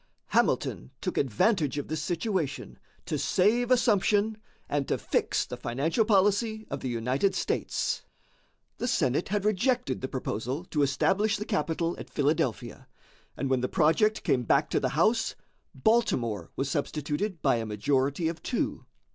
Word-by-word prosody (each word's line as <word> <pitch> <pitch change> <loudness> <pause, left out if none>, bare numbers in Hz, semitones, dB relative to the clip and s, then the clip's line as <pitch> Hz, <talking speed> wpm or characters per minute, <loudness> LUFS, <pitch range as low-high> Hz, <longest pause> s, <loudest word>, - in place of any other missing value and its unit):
Hamilton 60 - +1
took - - -3
advantage 145 - +1
of 145 - -3
this 155 0 -3
situation 170 - -2 0.3
to - - -2
save 230 +6 +2
assumption 220 -3 +3 0.3
and 145 -2 -1
to - - 0
fix - - 0
the - - -7
financial 145 - 0
policy 215 +2 +2
of 140 - -2
the 130 - -4
United 125 - 0
States. - - -1 0.8
The 245 - -1
Senate 155 - +1
had 205 0 -1
rejected 215 - +1
the 130 - -2
proposal 130 +4 -3
to 150 - +1
establish 195 +10 +2
the 210 - -5
capital 170 -4 -1
at - - -8
Philadelphia, 145 +2 -1 0.5
and 140 - -1
when 130 -1 +1
the 125 - -1
project 190 +6 +2
came 125 - +2
back 140 +5 +2
to - - +2
the 130 - 0
House, 220 +7 +2 0.4
Baltimore 120 - +1
was 135 - -1
substituted 150 +6 -2
by 135 -4 +3
a 115 - -3
majority 135 - 0
of 165 0 -4
two. 245 - -2
160 Hz, 150 wpm, -28 LUFS, 135-210 Hz, 0.8 s, assumption